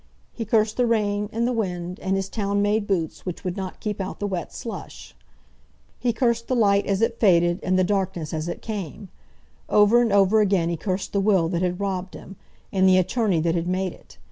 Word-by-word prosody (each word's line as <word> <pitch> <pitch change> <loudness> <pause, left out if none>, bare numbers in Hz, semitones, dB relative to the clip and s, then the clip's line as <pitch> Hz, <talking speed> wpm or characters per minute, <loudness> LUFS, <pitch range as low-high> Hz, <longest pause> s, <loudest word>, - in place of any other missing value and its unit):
He 230 - -5
cursed 215 0 +1
the 245 -1 +2
rain, 210 -2 0
and 230 +2 0
the 250 - 0
wind, 180 -5 -3
and 190 0 -1
his 195 -1 -1
town 200 -1 -1
made 205 +1 +1
boots, 170 -6 -2
which 180 -2 -6
would 180 -1 -3
not 190 -2 -6
keep 210 -2 -3
out 190 - -5
the 205 - -2
wet 185 -5 -3
slush. 230 - -8 0.8
He 245 - +1
cursed 235 -1 0
the 255 - 0
light 200 -4 +3
as 200 +2 +1
it 230 0 0
faded, 175 -3 +4
and 185 0 +1
the 185 - +4
darkness 180 -5 -1
as 155 +1 -3
it 175 - -5
came. 200 -3 -6 0.6
Over 210 +3 +5
and 235 -3 +1
over 200 +2 +4
again 190 -5 +2
he 170 - -1
cursed 185 +2 -3
the 200 - +2
will 190 -5 +3
that 175 -1 -1
had 180 0 -1
robbed 190 -2 -3
him, 195 - -11 0.4
and 190 -1 +4
the 185 - +5
attorney 190 -2 +1
that 165 0 +1
had 170 0 -1
made 185 0 -1
it. - - -18
195 Hz, 220 wpm, -24 LUFS, 180-215 Hz, 0.8 s, Over